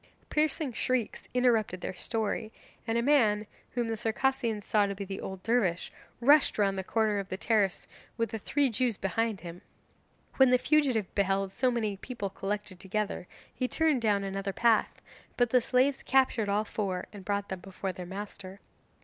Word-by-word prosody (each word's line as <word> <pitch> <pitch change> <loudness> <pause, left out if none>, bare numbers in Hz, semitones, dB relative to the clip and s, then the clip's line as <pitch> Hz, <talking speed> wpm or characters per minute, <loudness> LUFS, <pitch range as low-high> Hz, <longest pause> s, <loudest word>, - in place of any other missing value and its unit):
Piercing 300 -3 0
shrieks 250 0 -2
interrupted 230 -7 +2
their - - -4
story, 220 +2 -2 0.4
and 225 +1 +1
a 235 - +1
man, 220 -7 +3 0.3
whom 240 -1 0
the 225 - -1
Circassians 225 -1 0
saw 205 -2 +3
to 200 - -3
be 200 +1 -5
the 195 0 -6
old 190 -1 -7
dervish, 210 -7 +1 0.3
rushed 285 +5 +5
round 200 -2 +2
the 190 - -3
corner 215 0 +1
of 195 - -5
the 185 - -3
terrace 205 -3 +1 0.3
with 230 -2 -1
the 225 - -3
three 275 +4 +1
Jews 230 -1 0
behind 220 +2 -1
him. 175 0 -8 0.8
When 265 -1 +7
the 250 - +5
fugitive 260 -8 +1
beheld 195 -1 +1
so 255 +6 +1
many 220 -5 -1
people 205 -3 -5
collected 200 -1 -4
together, 200 -1 -3 0.3
he 255 - -1
turned 310 -3 +2
down 205 -3 +2
another 195 0 -3
path, 230 -1 +2 0.3
but 245 -2 +2
the 250 - +5
slaves 260 +3 +2
captured 255 -5 +2
all 210 +2 +1
four 190 -4 -3
and 200 -2 -9
brought 200 +1 -2
them 190 - -4
before 190 +1 -5
their 180 -1 -7
master. 195 0 -8
215 Hz, 175 wpm, -29 LUFS, 195-245 Hz, 0.8 s, When